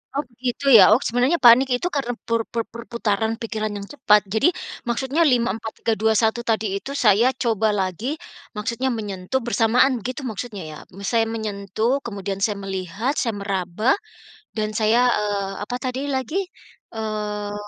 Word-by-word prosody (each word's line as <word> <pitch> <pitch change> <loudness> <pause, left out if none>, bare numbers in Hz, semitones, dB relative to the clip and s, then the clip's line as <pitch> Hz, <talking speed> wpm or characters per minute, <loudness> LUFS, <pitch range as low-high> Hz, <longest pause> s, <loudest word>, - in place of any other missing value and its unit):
Oh 285 - 0
begitu 245 +2 -4
ya? 200 -2 +9
Oh 220 - +6
sebenarnya 250 +8 +2
panik 250 +2 +7
itu 250 +8 +1
karena 270 -4 -1 0.2
per 230 0 +1
per 230 -1 -1
per 235 +1 -9
perputaran 225 -1 -1
pikiran 215 -2 -3
yang 200 0 -7
cepat? 210 -8 +3
Jadi 225 +11 +4 0.3
maksudnya 265 +6 -1
5-4-3-2-1 225 -3 +1
tadi 225 -1 0
itu 200 +7 -5
saya 235 -2 +4
coba 220 -2 +2
lagi, 205 - -2 0.4
maksudnya 235 +5 -2
menyentuh 205 0 -3
bersamaan 240 +1 +2
begitu 255 +4 -4
maksudnya 220 -2 -5
ya? 150 - -9 0.3
Saya 230 -2 +3
menyentuh 220 +3 -2
kemudian 195 -3 -4
saya 205 -2 0
melihat 195 - -3
saya 230 -7 0
meraba, 200 +4 0 0.6
dan 215 0 -2
saya, 220 +2 +3 0.2
eee, 205 -2 -1
apa 245 +4 -3
tadi 260 +3 -3
lagi? 265 +2 -2 0.6
Eee, 210 -2 -4
225 Hz, 145 wpm, -22 LUFS, 210-245 Hz, 0.6 s, ya